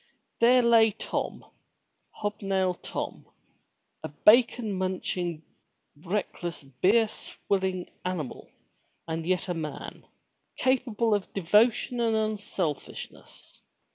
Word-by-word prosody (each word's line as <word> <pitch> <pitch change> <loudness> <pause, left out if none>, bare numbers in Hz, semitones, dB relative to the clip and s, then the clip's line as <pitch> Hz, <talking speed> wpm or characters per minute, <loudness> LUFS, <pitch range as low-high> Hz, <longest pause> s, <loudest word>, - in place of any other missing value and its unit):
There 245 +2 +6
lay 230 -1 +6
Tom, - - -4 0.6
hobnail 195 -3 -1
Tom! - - -5 0.7
a - - -5
bacon 225 - +4
munching, 180 -3 -2 0.5
reckless, 175 -1 -4
beer 185 - +3
swilling 190 -3 -3 0.2
animal 175 -8 -4 0.6
and 165 0 -3
yet 185 0 0
a 180 - -1
man, 155 -3 -6 0.5
capable 240 -4 +1
of 205 -2 -1
devotion 220 +6 +3
and 230 -1 +2
unselfishness. 205 -8 -4
195 Hz, 90 wpm, -28 LUFS, 175-225 Hz, 0.7 s, There